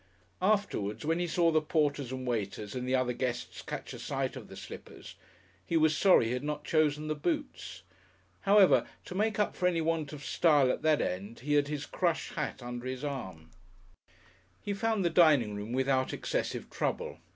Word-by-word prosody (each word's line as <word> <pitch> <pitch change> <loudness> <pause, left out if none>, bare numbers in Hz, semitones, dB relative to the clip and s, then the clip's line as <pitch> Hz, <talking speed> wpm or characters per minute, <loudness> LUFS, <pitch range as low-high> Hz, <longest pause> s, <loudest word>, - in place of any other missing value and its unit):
Afterwards, 185 - 0
when 165 +2 +1
he 175 - 0
saw 170 0 +3
the 155 -1 +3
porters 145 -4 0
and 130 0 -5
waiters 105 -3 -3
and 125 0 -4
the 130 - +2
other 130 -1 +1
guests 120 -1 -3
catch - - -6
a - - -8
sight - - -2
of - - -8
the - - -11
slippers, - - -10 0.5
he 165 - 0
was 155 -1 +4
sorry 185 - +5
he 115 - -1
had 125 +2 -2
not 150 0 -3
chosen 155 -1 +1
the 155 - 0
boots. 300 - -3 0.6
However, 200 -1 +5 0.2
to - - -7
make 210 +2 0
up 210 - 0
for 180 - +1
any 175 -2 +1
want 160 -2 -1
of 150 -1 -8
style 145 -6 +4
at - - -3
that 155 -1 +3
end, 100 +6 -4
he 145 +3 -1
had 145 -1 +3
his 145 -1 -4
crush 175 -3 -1
hat 150 -4 -4
under 120 +1 -5
his 130 +1 -5
arm. 95 - -6 1.1
He 205 - -3
found 215 -1 0
the 170 - +2
dining 145 -11 +5
room 105 +2 -5
without 130 0 +1
excessive - - -3
trouble. - - -2
150 Hz, 190 wpm, -30 LUFS, 125-170 Hz, 1.1 s, sorry